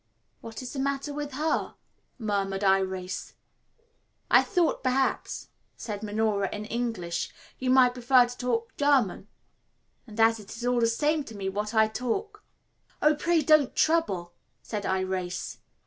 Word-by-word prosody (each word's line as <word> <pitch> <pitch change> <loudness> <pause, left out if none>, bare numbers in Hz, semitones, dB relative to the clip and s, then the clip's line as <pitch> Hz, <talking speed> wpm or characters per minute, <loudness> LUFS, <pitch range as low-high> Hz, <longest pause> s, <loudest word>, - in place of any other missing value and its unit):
"What 230 +2 -8
is 250 - -7
the 275 - -4
matter 280 +1 -1
with 290 -1 -5
her?" 310 +4 -1 0.4
murmured 200 -4 -1
Irais. 190 -1 0 1.0
"I - - +8
thought, 355 -5 +1
perhaps," 260 +1 0 0.3
said 205 -3 -5
Minora 210 -2 0
in 210 0 -5
English, 220 -7 -3 0.3
"you 255 - -1
might 255 -1 +6
prefer 250 0 +5
to 245 0 -8
talk 235 -2 -2
German, 270 -9 +2 0.8
and 215 0 -10
as 225 0 +4
it 205 0 -10
is 240 - -5
all 245 0 +2
the 230 - +3
same 300 +6 +1
to 225 - -10
me 190 -1 -2
what 210 +3 -3
I 220 0 +5
talk 395 - -3 0.3
" - - -37
"Oh, 300 +1 +6
pray 325 +2 +1
don't 300 -2 +4
trouble," 255 - +1 0.3
said 210 -2 -4
Irais. 185 -2 -2
230 Hz, 150 wpm, -27 LUFS, 205-275 Hz, 1.0 s, I